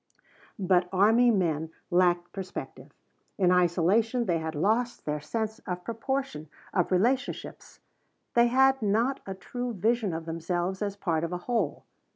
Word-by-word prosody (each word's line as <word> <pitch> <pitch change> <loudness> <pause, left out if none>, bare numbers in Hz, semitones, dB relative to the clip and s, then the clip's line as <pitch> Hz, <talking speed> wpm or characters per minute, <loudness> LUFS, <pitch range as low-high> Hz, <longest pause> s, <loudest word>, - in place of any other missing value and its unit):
But 185 -2 +2
army 220 +6 +5
men 165 -7 +1 0.2
lacked 175 -1 +2
perspective; 190 -2 -7 0.5
in 180 -2 +3
isolation 185 +7 +2
they 170 -4 +1
had 160 0 -4
lost 225 +9 0
their 150 0 -2
sense 220 +7 -3
of 180 0 -4
proportion, 230 - -3 0.2
of 180 -2 +1
relationships. 240 +9 -1 0.5
They 235 0 +5
had 265 +2 +4
not 225 +6 +1
a 195 - -4
true 245 +5 -5
vision 220 +1 +1
of 160 0 -5
themselves 175 +3 -2
as 200 -1 -2
part 170 -5 -1
of 170 - -2
a 180 - -2
whole. 225 - -1
195 Hz, 145 wpm, -28 LUFS, 175-230 Hz, 0.5 s, army